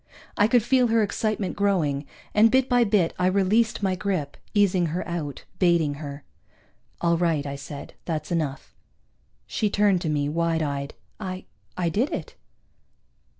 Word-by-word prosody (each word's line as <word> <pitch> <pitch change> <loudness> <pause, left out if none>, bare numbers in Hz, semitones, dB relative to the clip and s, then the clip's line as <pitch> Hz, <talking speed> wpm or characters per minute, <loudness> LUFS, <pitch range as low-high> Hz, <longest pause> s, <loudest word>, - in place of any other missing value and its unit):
I 205 - +4
could 240 -1 +3
feel 250 +1 +3
her 225 -1 +3
excitement 215 -2 -1
growing, 160 -9 +1 0.3
and 215 +2 +6
bit 260 +2 +3
by 245 -2 +4
bit 200 -6 +2
I 180 - +3
released 200 +4 +2
my 190 -1 +2
grip, 185 -6 -2 0.2
easing 190 -4 +3
her 170 +4 -3
out, 160 -5 -4
baiting 170 -5 +3
her. 140 -1 -7 0.8
"All 170 -1 +3
right," 165 -4 +1
I 140 0 -4
said. 140 +1 -8
"That's 160 0 -3
enough." 155 -5 -3 0.7
She 210 - -1
turned 200 -3 +3
to 160 - -2
me, 145 -1 0
wide 165 +1 0
eyed. 140 -1 -3 0.2
"I 185 0 -5 0.3
I 175 -2 +1
did 230 - 0
it." - - -5
180 Hz, 155 wpm, -25 LUFS, 155-205 Hz, 0.8 s, and